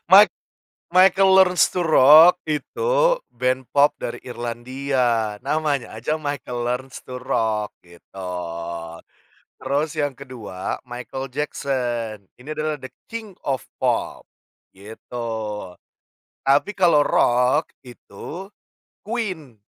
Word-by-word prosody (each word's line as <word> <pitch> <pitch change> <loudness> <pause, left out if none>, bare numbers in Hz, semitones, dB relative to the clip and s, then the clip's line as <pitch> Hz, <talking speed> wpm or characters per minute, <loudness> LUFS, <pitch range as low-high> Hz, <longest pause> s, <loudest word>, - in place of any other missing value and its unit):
mic 205 +2 +9 0.6
Michael 190 +1 +5
Learns 180 -2 +5
to 180 - -2
Rock 160 +3 +7
itu 150 - -3 0.5
band 130 +2 -1
pop 145 +1 +6
dari - - -5
Irlandia, 120 -1 -1
namanya 145 -2 -1
aja 130 +8 -1
Michael 145 -5 -4
Learns 130 +2 -3
to 125 - -7
Rock 110 -5 -1
gitu. 85 +2 -18 1.4
Terus 140 +4 -1
yang 145 -2 0
kedua 115 -9 -6
Michael 125 +2 -6
Jackson. 120 -7 -2 0.2
Ini 125 +4 -14
adalah 155 0 -2
"the 130 -2 -9 0.2
king 220 -4 -7
of 135 -4 -1 0.2
pop," - - 0 0.5
gitu. 105 +5 -11 1.3
Tapi 140 +8 +3
kalau 175 -5 +5
rock 125 +5 +2
itu 125 - -10 0.6
Queen 190 - -4
135 Hz, 105 wpm, -22 LUFS, 120-155 Hz, 1.4 s, mic